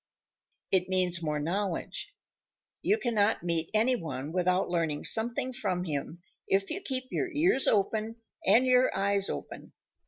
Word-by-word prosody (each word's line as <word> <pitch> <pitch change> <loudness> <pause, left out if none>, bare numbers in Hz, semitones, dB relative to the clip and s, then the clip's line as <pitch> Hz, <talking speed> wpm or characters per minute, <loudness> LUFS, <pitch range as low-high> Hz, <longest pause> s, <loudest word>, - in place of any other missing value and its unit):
It 185 -1 +2
means 180 -2 +1
more 150 -2 -1
knowledge. 180 +4 -3 0.7
You 420 - +2
cannot 220 - +1
meet 170 -2 -1
any 225 +4 +3
one 155 - -5
without 180 +1 +1
learning 165 -4 -1
something 240 +3 +2
from 190 -8 -2
him 160 +1 -5 0.2
if 195 0 +1
you 390 - -3
keep 260 -8 -3
your 375 - -1
ears 305 -2 +2
open 215 +2 +1 0.3
and 225 +7 +5
your 255 0 +4
eyes 200 0 +1
open. - - -7
195 Hz, 145 wpm, -29 LUFS, 175-240 Hz, 0.7 s, and